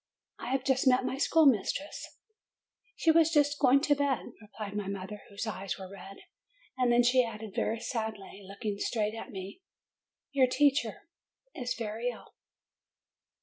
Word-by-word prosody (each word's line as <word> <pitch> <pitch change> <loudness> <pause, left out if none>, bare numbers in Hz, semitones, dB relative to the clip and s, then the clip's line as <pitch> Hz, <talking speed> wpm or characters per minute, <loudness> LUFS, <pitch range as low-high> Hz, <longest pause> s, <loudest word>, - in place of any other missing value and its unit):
"I - - -5
have 265 0 0
just 265 -1 +1
met 255 0 +4
my 260 - -2
schoolmistress/' 285 - +2 0.9
"She 325 - +3
was 325 0 +5
just 290 -2 +2
going 275 0 +5
to 295 - +3
bed," 280 -3 -1
replied 210 -1 -8
my 205 -2 -3
mother, 200 +1 -6
whose 200 +3 -5
eyes 195 -3 -4
were 190 -1 -8
red. 195 0 -10 0.6
And 250 -2 +2
then 240 +1 +5
she 250 +1 +5
added 220 -3 -7
very 225 - -1
sadly, 220 -4 -5
looking 200 +1 -5
straight 215 -1 -1
at 225 - -7
me, 195 - -8 0.7
"Your 270 -3 +4
poor - - -10
teacher 275 -7 +2 0.5
is 250 -4 -3
very 225 +2 -3
ill." 245 - -10
235 Hz, 155 wpm, -30 LUFS, 205-270 Hz, 0.9 s, was